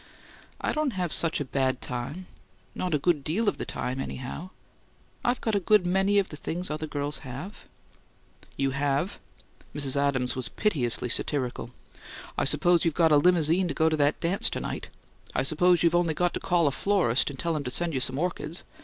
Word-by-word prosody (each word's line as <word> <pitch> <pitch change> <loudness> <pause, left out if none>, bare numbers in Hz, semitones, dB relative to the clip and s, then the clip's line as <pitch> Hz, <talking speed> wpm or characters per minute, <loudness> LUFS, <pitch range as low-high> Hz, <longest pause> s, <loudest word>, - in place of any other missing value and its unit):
"I - - -1
don't 305 -4 0
have 180 -5 +2
such 165 -1 +4
a 145 - -2
bad 130 -1 0
time 130 +9 -5 0.5
not 180 -4 -1
a - - +3
good 150 -1 +1
DEAL 200 +10 -1
of - - 0
the - - -3
time, 130 +1 -4
anyhow. 135 +7 -6 0.7
I've 245 +1 0
got 225 - -1
a 200 - +3
good 200 0 +3
MANY 195 +3 +2
of 195 -2 +2
the 150 - -8
things 175 +3 -3
other 155 +1 -3
girls 145 -1 -3
have 135 +11 -9 0.4
" - - -27
"You 135 -1 +1
have?" 140 +6 -1 0.6
Mrs. 140 -2 0
Adams 140 -3 0
was 125 -3 -4
piteously 125 - +1
satirical. 125 -2 -1 0.7
"I - - 0
suppose 175 -1 +3
you've 165 -3 0
got 165 -2 +4
a 150 - +7
limousine 175 +2 +3
to 145 - -4
go 160 0 +3
to 155 - 0
that 145 0 +2
dance 175 +4 +1
to - - -4
night? - - -5 0.5
I - - +2
suppose 175 +5 +3
you've 170 -1 +3
only 175 -2 +2
got 175 +1 +1
to - - -3
call 175 -3 +1
a 145 - +3
florist 175 - +2
and 140 - -8
tell 170 +2 -1
him 150 - -2
to - - -2
send 170 +5 +1
you 130 - 0
some 130 +1 0
orchids? 170 0 -3
155 Hz, 205 wpm, -27 LUFS, 140-180 Hz, 0.7 s, a